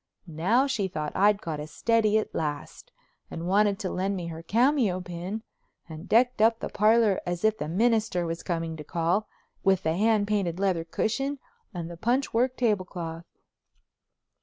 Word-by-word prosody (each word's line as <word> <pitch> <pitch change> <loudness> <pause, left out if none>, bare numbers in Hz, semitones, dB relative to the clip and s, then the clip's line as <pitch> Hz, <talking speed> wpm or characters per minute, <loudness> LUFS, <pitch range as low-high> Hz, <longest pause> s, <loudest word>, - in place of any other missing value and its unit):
Now 185 - +2
she 265 -8 -1
thought 155 -4 -5
I'd 205 +2 +3
got 160 -4 -4
a 150 - -6
steady 220 +6 +2
at 215 - -2
last 150 -2 -4 0.4
and 165 +1 -5
wanted 200 +1 +3
to 190 -3 -4
lend 195 +2 -1
me 175 -2 -4
her 165 0 -7
cameo 230 - +2
pin, 180 +4 -6 0.4
and 160 +2 -10
decked 245 0 +3
up 225 +1 +4
the - - -4
parlor 215 -1 +3
as 175 +3 -2
if 220 0 +2
the 150 - -3
minister 215 -1 +1
was 165 0 -4
coming 165 -2 -3
to 150 - -7
call, 175 +6 0 0.4
with 190 -1 +3
the 160 +1 0
hand 210 +1 +2
painted 190 -5 -1
leather 185 -4 +1
cushion 270 - -1 0.3
and 170 -2 -5
the 170 0 -9
punch 245 +8 0
work 250 +3 +1
tablecloth. 180 -7 -2
195 Hz, 170 wpm, -27 LUFS, 170-220 Hz, 0.4 s, up